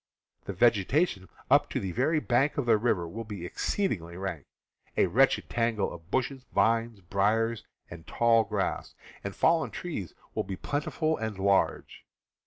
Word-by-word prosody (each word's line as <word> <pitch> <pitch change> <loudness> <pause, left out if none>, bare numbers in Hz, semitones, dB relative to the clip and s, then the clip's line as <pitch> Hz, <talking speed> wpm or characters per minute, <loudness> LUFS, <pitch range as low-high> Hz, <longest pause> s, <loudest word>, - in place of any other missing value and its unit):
The 100 - -4
vegetation 105 - +2 0.2
up - - +5
to - - -2
the 95 - -3
very 145 - +1
bank 135 +1 +1
of 140 - 0
the 115 -3 +4
river 105 -7 0
will 115 +7 -6
be 105 -5 -7
exceedingly 90 - -2
rank, 90 -6 -5 0.5
a - - +5
wretched - - +3
tangle 115 -5 0
of 85 0 -12
bushes, 130 +3 -1
vines, 115 0 +1
briars, 105 +5 0 0.2
and 85 -1 -11
tall 115 -1 +3
grass, 100 - -3 0.3
and 100 - -5
fallen 165 -1 +3
trees 130 - -6 0.2
will - - -1
be 95 - -5
plentiful 155 - -1
and 110 -3 -4
large. 100 0 0
110 Hz, 155 wpm, -28 LUFS, 95-125 Hz, 0.5 s, up